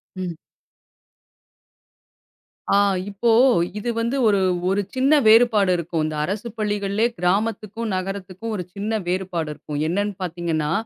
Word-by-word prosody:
ம். 180 Hz, -3 st, -4 dB, 2.4 s
ஆ -, -, +5 dB, 0.3 s
இப்போ, 215 Hz, +4 st, +1 dB, 0.5 s
இது 240 Hz, -, -3 dB
வந்து 235 Hz, +4 st, -1 dB
ஒரு 200 Hz, -2 st, +3 dB, 0.3 s
ஒரு 200 Hz, +2 st, +1 dB
சின்ன 270 Hz, +4 st, +4 dB
வேறுபாடு 220 Hz, -4 st, +5 dB
இருக்கும். 165 Hz, -2 st, -2 dB, 0.2 s
அரசுப் 210 Hz, +6 st, -4 dB
பள்ளிகள்ளே, 205 Hz, 0 st, 0 dB
கிராமத்துக்கும், 215 Hz, +4 st, -1 dB
நகரத்துக்கும் 195 Hz, +3 st, -5 dB
ஒரு 180 Hz, -, -3 dB
சின்ன 210 Hz, +3 st, -3 dB
வேறுபாடு 180 Hz, -3 st, -2 dB
இருக்கும். 145 Hz, 0 st, -6 dB
என்னன்னு 205 Hz, +4 st, -1 dB
பாத்தீங்கன்னா? 165 Hz, -3 st, -2 dB
200 Hz, 110 wpm, -22 LUFS, 180-220 Hz, 2.4 s, ஆ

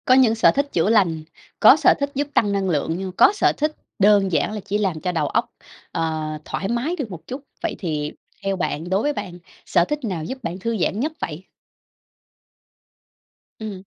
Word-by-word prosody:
Có 255 Hz, -, +5 dB
những 255 Hz, -4 st, +5 dB
sở 225 Hz, -, +5 dB
thích 280 Hz, +1 st, 0 dB
chữa 175 Hz, +4 st, +2 dB
lành, 175 Hz, -8 st, +3 dB, 0.4 s
có -, -, +9 dB
sở -, -, +5 dB
thích 280 Hz, 0 st, -1 dB
giúp 285 Hz, +1 st, 0 dB
tăng 205 Hz, -2 st, +3 dB
năng 195 Hz, -1 st, 0 dB
lượng, 160 Hz, 0 st, 0 dB
nhưng 190 Hz, 0 st, -4 dB
có 190 Hz, -, +5 dB
sở 415 Hz, -, +3 dB
thích 305 Hz, +1 st, 0 dB, 0.2 s
đơn 200 Hz, -1 st, +5 dB
giản 170 Hz, -, +1 dB
là 215 Hz, -, -4 dB
chỉ 205 Hz, -, 0 dB
làm 190 Hz, -6 st, -1 dB
cho 180 Hz, -, -1 dB
đầu 160 Hz, -4 st, 0 dB
óc, -, -, -1 dB, 0.4 s
ờ, 160 Hz, -1 st, -2 dB, 0.2 s
thoải 195 Hz, -, -3 dB
mái 240 Hz, -, -1 dB
được 275 Hz, -, -5 dB
một 170 Hz, -3 st, -9 dB
chút. 260 Hz, +3 st, -5 dB, 0.2 s
Vậy -, -, -1 dB
thì 150 Hz, -4 st, -2 dB, 0.3 s
theo 195 Hz, 0 st, 0 dB
bạn, 175 Hz, -2 st, -3 dB
đối 190 Hz, +2 st, +2 dB
với 295 Hz, +3 st, 0 dB
bạn, 175 Hz, -9 st, -6 dB, 0.3 s
sở 170 Hz, -, +3 dB
thích 295 Hz, +7 st, -2 dB
nào 180 Hz, -7 st, -3 dB
giúp 260 Hz, +10 st, -6 dB
bạn 175 Hz, 0 st, -4 dB
thư 230 Hz, +3 st, -2 dB
giãn 195 Hz, +2 st, 0 dB
nhất 300 Hz, +6 st, 0 dB
vậy? 155 Hz, +3 st, -5 dB, 2.2 s
Ừm. 205 Hz, -4 st, -6 dB
195 Hz, 205 wpm, -22 LUFS, 170-235 Hz, 2.2 s, có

